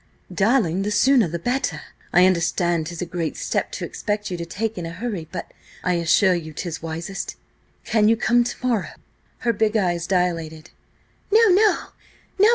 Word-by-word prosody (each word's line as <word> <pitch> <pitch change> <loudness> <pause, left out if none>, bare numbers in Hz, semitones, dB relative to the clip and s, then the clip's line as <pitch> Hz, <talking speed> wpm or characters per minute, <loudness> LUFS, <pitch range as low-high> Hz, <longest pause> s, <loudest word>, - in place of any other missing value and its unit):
"Darling, 200 -4 +2
the 205 - -1
sooner 245 0 +4
the 170 +1 -3
better. 245 +10 -2 0.3
I 180 +1 +6
understand 170 -2 +1
'tis 170 0 -5
a - - -3
great 170 -2 -3
step - - -2
to - - -3
expect 210 -1 -3
you 180 - -2
to 170 0 -5
take 220 +5 -3
in 170 - -4
a - - -5
hurry, 180 -2 -5
but 170 - -6 0.3
I 180 - +1
assure 170 +3 +3
you 160 -3 -4
'tis 165 0 -5
wisest. 165 +4 -5 0.5
Can 220 -2 +3
you 225 - +3
come 240 +2 +3
to 245 +1 -4
morrow?" 230 -5 -1 0.5
Her 235 - +3
big 220 +1 +1
eyes 175 -4 0
dilated. 165 -4 -1 0.6
"No! 445 +1 +6
No! 405 +3 +3
185 Hz, 170 wpm, -22 LUFS, 170-225 Hz, 0.6 s, I